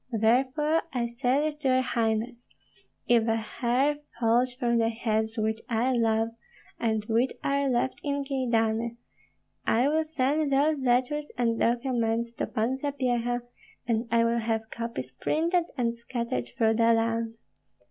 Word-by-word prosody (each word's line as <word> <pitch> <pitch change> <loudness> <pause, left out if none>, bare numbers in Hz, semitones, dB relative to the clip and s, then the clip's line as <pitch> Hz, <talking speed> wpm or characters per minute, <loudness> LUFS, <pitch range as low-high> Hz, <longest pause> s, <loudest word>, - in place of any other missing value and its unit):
Therefore 260 +8 +2
I 245 -2 -1
say 245 +3 0
this 305 -1 -1
to 300 -2 -2
your 255 0 +4
highness: 230 0 -1 0.6
If 235 -1 +4
a 225 - +2
hair 245 +6 0 0.2
falls 240 +2 +3
from 240 -2 0
the 225 0 +2
heads 220 0 -1
which 220 0 -1
I 240 +3 +1
love 225 -1 +2 0.5
and 220 -2 0
which 230 +3 +1
are 280 0 +1
left 255 +1 0
in 285 -1 -1
Kyedani, 235 -4 0 0.7
I 240 +4 +3
will 315 +1 +2
send 300 -1 0
those 290 +2 +3
letters 260 +4 +1
and 230 -2 +1
documents 235 -1 0
to - - 0
Pan 245 +3 -1
Sapyeha, 245 -4 -1 0.4
and 230 0 0
I 230 0 +3
will 230 0 +1
have 225 -1 -2
copies 230 - -5
printed 330 - 0
and 235 -2 0
scattered 235 - -3
through 225 -1 +3
the 230 0 +5
land. 225 0 0
235 Hz, 145 wpm, -27 LUFS, 225-265 Hz, 0.7 s, the